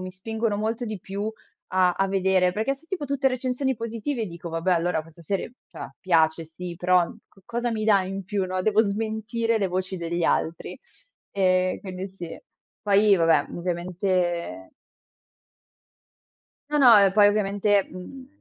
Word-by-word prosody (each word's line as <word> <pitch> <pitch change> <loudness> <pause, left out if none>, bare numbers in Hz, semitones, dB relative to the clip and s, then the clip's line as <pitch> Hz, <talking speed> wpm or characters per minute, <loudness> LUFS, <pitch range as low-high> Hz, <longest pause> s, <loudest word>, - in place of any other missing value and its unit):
mi 185 0 -5
spingono 220 +3 -2
molto 225 +3 -2
di 215 -3 -5
più 200 +4 -4 0.4
a 180 -1 +4
a 195 +2 0
vedere, 190 -1 +2
perché 220 +9 -1
se 310 +4 -22
tipo 365 -7 -3
tutte 275 -1 +1
recensioni 255 0 -1
positive 230 +1 -3
dico: 170 0 -8
"Vabbè 165 +3 0
allora 170 -2 +1
questa 165 +1 -17
serie, 195 +7 -3 0.2
cioè - - -8
piace 165 -3 +2
sì, 170 +2 -8
però, 180 0 +3
uhm, 215 - -10
co 195 - -24
cosa 235 +1 -2
mi 215 -1 -2
dà 200 -3 +4
in 195 +1 -5
più", 195 0 -1
no, 185 0 -2
devo 215 +2 +3
smentire 220 +2 -1
le 195 -2 0
voci 185 +1 -3
degli 170 0 -2
altri. 165 +1 -1 0.5
Ehm, 185 -1 +2
quindi 190 0 -6
sì. 175 -3 -8 0.5
Poi 205 -1 +5
vabbè 165 -2 +3
ovviamente 175 - -2 2.0
No, 295 - +2
no, 245 -5 +8
ehm, 195 -1 +5
poi 205 +1 +6
ovviamente, 205 -1 +2
uhm, 255 +9 -10
195 Hz, 160 wpm, -25 LUFS, 180-220 Hz, 2.0 s, no